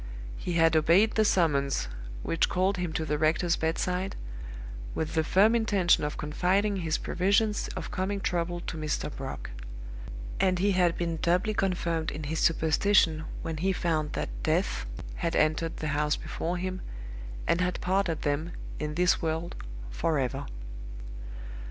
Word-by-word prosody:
He 175 - -3
had 165 -1 +4
obeyed 170 +8 +5
the 220 - +4
summons 140 - +2 0.4
which 165 - +1
called 190 +2 +1
him 180 -2 -2
to 160 - -1
the 150 0 -1
rector's 165 +3 +3
bedside, 180 +4 -1 0.8
with 160 - -2
the 160 -1 +2
firm 200 +7 +5
intention 205 -8 +3
of 150 0 -2
confiding 190 +7 +1
his 165 -3 0
previsions 200 +4 +1
of - - -5
coming 200 +1 -1
trouble 175 -2 -1
to 165 - -5
Mr. 155 -1 -2
Brock; 135 - -6 0.9
and 185 -1 +3
he 200 +3 +3
had 180 -3 +3
been 170 -1 -1
doubly 180 +7 +2
confirmed 170 -5 0
in 155 - -5
his 155 +2 -2
superstition 160 0 +3 0.2
when 165 -1 -3
he 190 +5 +1
found 160 -5 0
that - - -2
Death - - 0 0.3
had - - -1
entered 155 +2 +1
the 155 - -2
house 150 +1 +1
before 175 +2 -3
him, 185 +1 -3 0.6
and 170 - +2
had 180 0 0
parted 185 -3 0
them, 150 +4 -1 0.3
in 150 0 -3
this 180 +2 +3
world, 160 +1 -2 0.4
forever. 135 - 0
170 Hz, 150 wpm, -29 LUFS, 155-185 Hz, 0.9 s, obeyed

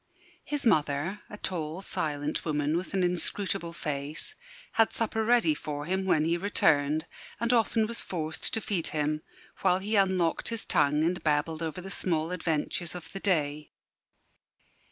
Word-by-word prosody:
His 290 -2 -3
mother 155 0 +2
a 210 - -8
tall, 170 -2 -2
silent 150 -4 -2
woman 150 -1 0
with 180 +3 -2
an 190 - +2
inscrutable 180 0 +1
face 150 - -3 0.4
had 225 -1 +3
supper 225 -1 -1
ready 240 +7 +4
for 145 - -5
him 190 +3 0
when 155 -5 +3
he 170 +1 +2
returned, 155 -5 +2 0.3
and 235 +2 +2
often 225 -1 +3
was 230 +1 -1
forced 160 -3 -2
to 225 - -1
feed 185 -7 -1
him, 150 +1 0 0.4
while 185 -1 +3
he 205 +3 -2
unlocked 185 -4 +2
his 230 -1 -3
tongue 150 -2 +3
and 175 +2 0
babbled 155 +1 +1
over 165 +1 -3
the 195 +1 -8
small 165 -3 0
adventures 170 0 -1
of 175 0 -8
the 195 - -4
day. 150 -6 0
170 Hz, 155 wpm, -29 LUFS, 155-195 Hz, 0.4 s, ready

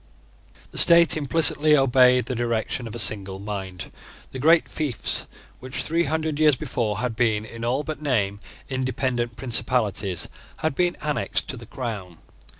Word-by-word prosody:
The - - -1
state 170 -1 +7
implicitly 155 0 +3
obeyed 125 -1 +4
the 130 - -4
direction 120 0 -2
of 110 - -8
a - - -4
single 100 -4 +1
mind. 95 -3 -7 0.4
The 130 - -7
great 160 +5 +4
fiefs 145 -7 0 0.3
which, 130 0 -4
three 165 +2 0
hundred 155 +1 -2
years 155 -3 +4
before, 120 -7 -3
had 125 -3 -2
been, 110 -3 0
in 115 +1 -9
all 130 +5 -1
but 155 -1 -6
name, 105 -9 -1 0.3
independent 130 -2 -2
principalities, 110 -7 0 0.3
had 160 -2 -1
been 175 +3 0
annexed 150 -1 -2
to - - -2
the 115 -1 -12
crown. 105 - -6
125 Hz, 150 wpm, -23 LUFS, 110-150 Hz, 0.4 s, state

